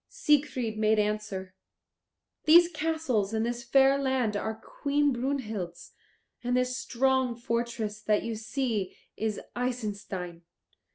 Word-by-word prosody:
Siegfried 290 Hz, -, +1 dB
made 215 Hz, 0 st, +3 dB
answer, 210 Hz, -3 st, -2 dB, 0.9 s
"These 340 Hz, +2 st, +8 dB
castles 300 Hz, -, 0 dB
and 220 Hz, +1 st, +1 dB
this 240 Hz, 0 st, -3 dB
fair 270 Hz, +3 st, +4 dB
land 260 Hz, -6 st, 0 dB
are 220 Hz, +2 st, -2 dB
Queen 285 Hz, +5 st, 0 dB
Brunhild's 225 Hz, -9 st, -3 dB, 0.5 s
and 245 Hz, +1 st, +1 dB
this 250 Hz, 0 st, +1 dB
strong 260 Hz, -1 st, +1 dB
fortress 235 Hz, -2 st, -2 dB
that 210 Hz, -1 st, +1 dB
you 230 Hz, -, -3 dB
see 220 Hz, -3 st, -2 dB, 0.2 s
is 220 Hz, -1 st, -2 dB, 0.2 s
Isenstein. 205 Hz, -8 st, -4 dB
235 Hz, 115 wpm, -29 LUFS, 215-265 Hz, 0.9 s, These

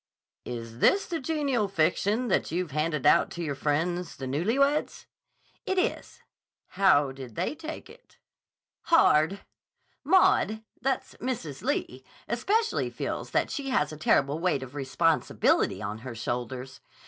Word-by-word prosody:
"Is 115 Hz, -1 st, -7 dB
this 395 Hz, -, +4 dB
the 335 Hz, -2 st, -3 dB
genial 275 Hz, -7 st, 0 dB
fiction 195 Hz, +7 st, +1 dB
that -, -, +1 dB
you've 175 Hz, 0 st, -2 dB
handed 150 Hz, -1 st, -1 dB
out -, -, +5 dB
to 170 Hz, -, -5 dB
your 145 Hz, -3 st, -2 dB
friends, 165 Hz, +5 st, -1 dB
the 135 Hz, -, -6 dB
newly 165 Hz, -, 0 dB
weds?" 280 Hz, +2 st, +1 dB, 0.6 s
"It 380 Hz, -, -2 dB
is." 370 Hz, -, -2 dB, 0.5 s
"How 150 Hz, -8 st, +3 dB
did 130 Hz, -4 st, -10 dB
they -, -, -1 dB
take 320 Hz, +2 st, -8 dB
it?" 475 Hz, +4 st, -18 dB, 0.7 s
"Hard. 195 Hz, -, +4 dB, 0.6 s
Maud—that's 265 Hz, -, +1 dB
Mrs. 220 Hz, -, -4 dB
Lee—especially 245 Hz, -, -1 dB
feels -, -, -4 dB
that -, -, 0 dB
she 280 Hz, -2 st, -3 dB
has 255 Hz, -, +1 dB
a -, -, -7 dB
terrible 145 Hz, 0 st, +2 dB
weight 170 Hz, -6 st, 0 dB
of 130 Hz, 0 st, -10 dB
responsibility 145 Hz, +4 st, +1 dB
on 105 Hz, +2 st, -4 dB
her 120 Hz, 0 st, -8 dB
shoulders. 125 Hz, +3 st, -5 dB
170 Hz, 135 wpm, -27 LUFS, -, 0.7 s, out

